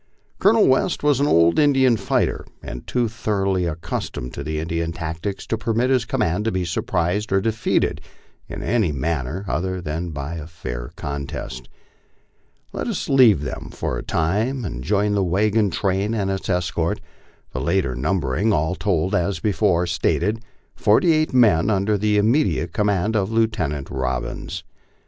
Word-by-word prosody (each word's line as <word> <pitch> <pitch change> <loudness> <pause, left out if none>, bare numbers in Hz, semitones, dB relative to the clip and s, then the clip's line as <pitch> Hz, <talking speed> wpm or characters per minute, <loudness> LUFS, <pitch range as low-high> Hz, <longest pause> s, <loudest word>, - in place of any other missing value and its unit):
Colonel 215 +2 +5
West 135 +6 +2
was 145 -3 +3
an 145 - +2
old 85 - +4
Indian 135 -4 +4
fighter, 100 -3 0 0.2
and 60 - -7
too 125 -2 +1
thoroughly 100 -5 -1
accustomed 75 -6 -4
to - - -5 0.2
Indian 80 +1 -2
tactics 80 +4 -4
to 115 - -2
permit 115 +4 +1
his 125 -3 +2
command 105 -6 0
to 115 - +1
be 95 -2 -1
surprised 90 +4 -1
or 95 - +4
defeated 115 +2 0 0.5
in - - -6
any 110 -8 +1
manner 75 +4 -2
other 95 +1 -1
than 85 +1 -4
by 75 +2 -5
a 80 -1 -7
fair - - -6
contest. 70 -3 -6 1.0
Let - - -3
us - - -3
leave 120 - +5
them - - -5
for - - -3
a - - -7
time 110 +10 0
and 60 -8 -5
join 105 +3 +1
the 100 -1 +2
wagon 105 +4 +2
train 100 +4 0
and 100 -3 0
its 95 0 -4
escort 85 -2 0 0.5
the 65 - -3
latter 85 -4 +1
numbering, 80 - 0
all 80 0 +1
told, 95 -1 0
as 100 0 0
before 100 -4 +2
stated, 95 +5 0 0.4
forty 115 - +4
eight 155 0 +1
men 110 -9 +4
under 105 0 +2
the 105 +1 +1
imme 115 +9 +4
diate 85 -3 -2
command 105 +1 +1
of 100 0 0
Lieutenant 105 -12 0
Robbins. 65 -1 -3
95 Hz, 160 wpm, -22 LUFS, 80-110 Hz, 1.0 s, Colonel